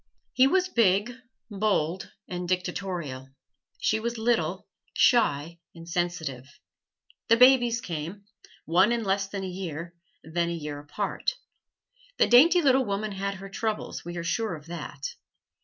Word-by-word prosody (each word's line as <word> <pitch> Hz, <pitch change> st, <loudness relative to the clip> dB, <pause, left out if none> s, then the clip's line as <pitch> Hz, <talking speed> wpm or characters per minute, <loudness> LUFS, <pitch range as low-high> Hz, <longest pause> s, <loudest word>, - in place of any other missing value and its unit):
He 260 Hz, +1 st, +5 dB
was 370 Hz, +4 st, +2 dB
big, 215 Hz, -, +2 dB, 0.4 s
bold 190 Hz, -4 st, 0 dB, 0.2 s
and 180 Hz, -1 st, -5 dB
dictatorial; 180 Hz, -7 st, -3 dB, 0.5 s
she 220 Hz, -, +1 dB
was 235 Hz, +1 st, -3 dB
little, 195 Hz, -6 st, 0 dB, 0.3 s
shy 170 Hz, -, +3 dB, 0.2 s
and 165 Hz, 0 st, -11 dB
sensitive. 165 Hz, -7 st, -3 dB, 0.8 s
The 230 Hz, -, +5 dB
babies 245 Hz, -2 st, +5 dB
came 170 Hz, +4 st, -6 dB, 0.4 s
one 185 Hz, +7 st, +4 dB
in 235 Hz, -1 st, 0 dB
less 195 Hz, 0 st, 0 dB
than 195 Hz, -1 st, -5 dB
a -, -, -3 dB
year, 175 Hz, -2 st, -6 dB, 0.3 s
then 170 Hz, +2 st, -1 dB
a -, -, -2 dB
year 150 Hz, -3 st, -5 dB
apart. 195 Hz, -, -3 dB, 0.8 s
The -, -, +5 dB
dainty 320 Hz, +8 st, +6 dB
little 265 Hz, -1 st, +4 dB
woman 205 Hz, -1 st, -2 dB
had 200 Hz, 0 st, -3 dB
her 195 Hz, +1 st, -9 dB
troubles, 220 Hz, +1 st, -3 dB
we 175 Hz, +1 st, -6 dB
are 170 Hz, -, -3 dB
sure 215 Hz, +2 st, -1 dB
of 150 Hz, -1 st, -12 dB
that. 160 Hz, -4 st, -6 dB
190 Hz, 140 wpm, -27 LUFS, 170-225 Hz, 0.8 s, dainty